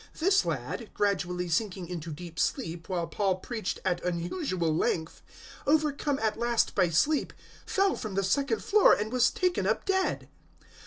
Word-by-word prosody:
This 390 +5 +4
lad, 230 - -3
gradually 180 -3 0
sinking 185 +1 -1
into 170 -2 -6
deep 165 +2 -8
sleep 165 +2 -2
while 175 -3 -1
Paul 190 +3 0
preached 215 +2 -4
at 180 -2 0
unusual 175 - -1
length, 160 0 -1 0.5
overcome 295 -1 +2
at 220 -2 -1
last 235 -1 +1
by 185 -3 +3
sleep, 285 - +2 0.4
fell 390 0 +2
from 215 -4 -5
the 195 - +1
second 245 +4 0
floor 420 -1 +6
and 215 +2 -1
was 250 -1 +4
taken 365 -1 0
up - - 0
dead. 380 -1 0
205 Hz, 155 wpm, -29 LUFS, 175-280 Hz, 0.5 s, floor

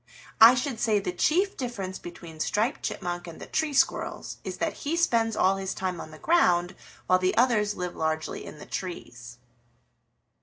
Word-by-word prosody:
I 230 +3 +10
should 250 -2 -2
say 220 -2 +2
the 195 -3 -2
chief 365 - +1
difference 200 -7 -5
between 170 -2 -10
Striped 220 - 0
Chipmunk 175 -1 -4
and 165 - -9
the - - -7
Tree 315 -1 -1
Squirrels 275 - 0
is - - -5
that - - -2
he 305 +3 -1
spends 230 -10 +2
all 195 +1 +3
his 190 -1 -3
time 185 -2 -3
on - - -9
the 155 - -12
ground 180 - +3 0.3
while 185 0 +4
the 185 0 0
others 215 -4 +3
live 180 -1 -4
largely 160 0 -2
in - - -10
the - - -10
trees." 125 -10 -7
190 Hz, 180 wpm, -27 LUFS, 175-240 Hz, 0.3 s, I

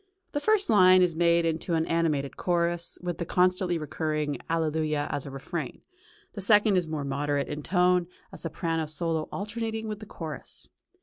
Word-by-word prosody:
The 290 - -1
first 425 +4 +2
line 185 -3 +6
is 175 -2 +2
made 170 0 +3
into 165 +1 0
an 160 0 +1
animated 155 -5 0
chorus, 170 -1 0
with 175 -2 -3
the - - -1
constantly 180 0 +2
recurring 150 -2 -2
Alleluia 155 -2 0
as 140 - -3
a - - -5
refrain; 135 +1 -6 0.5
the 200 - -6
second 210 +1 +5
is 180 -3 +1
more 155 -2 -3
moderate 140 0 -1
in 150 0 -5
tone, 180 +1 +2 0.2
a - - -9
soprano 165 -1 -2
solo 160 0 -2
alternating 220 +2 -4
with 210 -1 -4
the 215 - -10
chorus. 160 -5 -7
170 Hz, 170 wpm, -27 LUFS, 155-185 Hz, 0.5 s, line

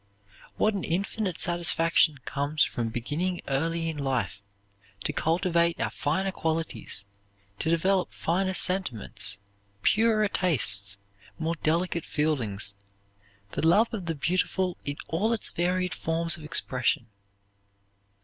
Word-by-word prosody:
What 215 - +2
an 195 - -3
infinite 190 +1 -2
satisfaction 165 -2 +3
comes 145 +2 +1
from 115 -1 -1
beginning 155 +11 -2
early 165 +4 0
in 160 -2 -4
life 130 -9 -2 0.6
to - - -1
cultivate 170 0 +1
our - - -1
finer 165 +6 -1
qualities, 160 - -3 0.5
to 160 - -1
develop 180 +2 +2
finer 185 +3 -1
sentiments, 110 - +2 0.5
purer 215 -1 +3
tastes, 100 - +1 0.4
more 165 0 -1
delicate 170 +1 0
feelings, 115 -10 +1 0.8
the 160 - 0
love 215 +8 +4
of 195 -6 -4
the 165 - -1
beautiful 180 +3 0
in 145 0 -3
all 205 +8 +1
its 225 - 0
varied 180 0 0
forms 165 +2 0
of 165 - -10
expression! 130 -5 +1
165 Hz, 120 wpm, -27 LUFS, 145-185 Hz, 0.8 s, love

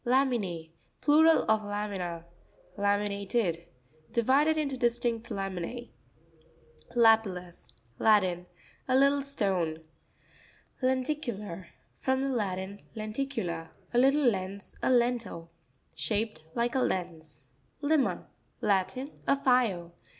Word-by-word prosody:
La'min&%.—Plural 250 - +2
of 220 0 +3
lamina. 200 -5 -4 0.5
La'miInATED.—Divided 200 - 0
into 285 -3 -1
distinct 235 -1 0
lamine. 195 +3 -4 1.0
Lapi'LtLus.—Latin. 180 - +2 0.4
A 255 0 +3
little 280 +1 +4
stone. 190 - -1 1.0
Lenti'cutar.—From 255 - -2
the 275 - 0
Latin, 200 -3 -3
len 215 -1 -5
ticula, 215 -12 -3 0.2
a 240 - +4
little 275 +3 +4
lens, 195 -2 -2
a - - +1
_ - - +4
lentil, 235 -9 +1 0.4
Shaped 160 - -1
like 235 +1 0
a 265 - +2
lens, 165 - -3 0.4
Li'ma.—Latin. 235 - -1 0.2
A - - +5
file. 235 -11 +1
210 Hz, 85 wpm, -29 LUFS, 180-255 Hz, 1.0 s, A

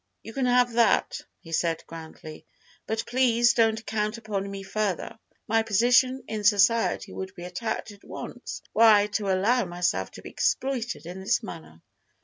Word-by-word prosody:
"You 225 - -9
can 265 0 0
have 245 -1 +3
that," 235 0 +2 0.2
he 165 - -13
said 165 0 0
grandly, 160 -1 -10 0.4
"but 220 0 -2
please 240 -1 +3
don't 225 -1 +2
count 215 +1 -2
upon 205 -3 -4
me 195 0 -7
further. 205 +1 -3 0.3
My 225 0 +3
position 245 +5 +3
in 215 -1 -4
society 210 +2 +3
would 190 0 -6
be 175 - -9
attacked 195 +5 -4
at 200 -1 -16
once - - -8
were - - +1
I 210 -2 +7
to 210 -1 -2
allow 210 +6 +2
myself 175 - -1
to - - -11
be - - -8
exploited 255 -7 -1
in 180 +2 -7
this 190 +4 0
manner." 160 - -10
215 Hz, 165 wpm, -26 LUFS, 190-235 Hz, 0.4 s, I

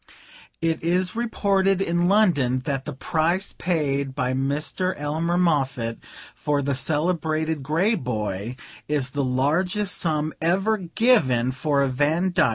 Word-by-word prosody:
"'It 165 -1 0
is 180 +3 +1
reported 195 -5 +1
in 175 -2 +1
London 145 - +3
that 135 -2 -2
the 150 - -5
price 170 +7 0
paid 140 -6 -1
by 130 -2 0
Mr. 150 +7 -1
Elmer 160 +4 -1
Moffatt 135 -9 0 0.3
for 145 -1 -1
the 140 +1 0
celebrated 155 +2 -1
Grey 165 +11 +1
Boy 110 - -3 0.3
is 145 -4 -1
the 140 +1 -1
largest 170 +10 0
sum 155 -2 -1
ever 195 +6 +2
given 165 - +2
for 140 +1 +1
a - - +2
Vandyck. 155 +6 +2
155 Hz, 130 wpm, -24 LUFS, 135-180 Hz, 0.3 s, London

